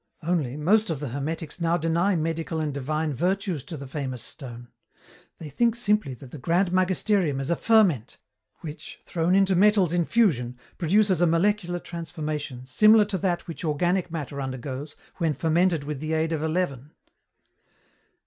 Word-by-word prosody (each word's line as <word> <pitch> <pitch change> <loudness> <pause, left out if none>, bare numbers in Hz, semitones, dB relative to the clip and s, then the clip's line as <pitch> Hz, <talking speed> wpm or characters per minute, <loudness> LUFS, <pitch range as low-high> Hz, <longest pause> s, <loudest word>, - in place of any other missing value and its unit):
Only, 155 -6 -1
most 210 +8 +3
of 160 -4 -2
the 145 -2 -4
hermetics 155 +5 -4
now 170 +1 +2
deny 170 +4 +1
medical 165 0 -2
and 150 -2 -2
divine 150 +3 -2
virtues 180 0 -1
to 165 - -7
the 140 - -8
famous 130 -3 -5
stone. 120 -4 -9 0.7
They 160 - -8
think 230 - +1
simply 210 - 0
that 125 +1 -13
the 150 - -8
grand 175 +6 +1
magisterium 185 -4 +1
is 135 +4 -2
a - - +3
ferment, 185 - +2 0.4
which, 155 -2 -8
thrown 170 +2 +1
into 195 -1 +4
metals 195 -2 +4
in 175 -1 +2
fusion, 130 - +1 0.2
produces 190 +1 +3
a 175 - +5
molecular 175 +1 +1
transformation 155 -6 -5
similar 215 +11 +5
to 200 -2 -3
that 175 -1 -1
which 165 +1 -7
organic 175 +4 0
matter 145 -4 -5
undergoes 135 +2 -5 0.2
when 165 -4 0
fermented 165 +1 +2
with 145 -1 -5
the 155 +2 -3
aid 160 +1 0
of 155 - -2
a 160 - 0
leaven. 155 -5 -2
165 Hz, 165 wpm, -25 LUFS, 145-185 Hz, 0.7 s, a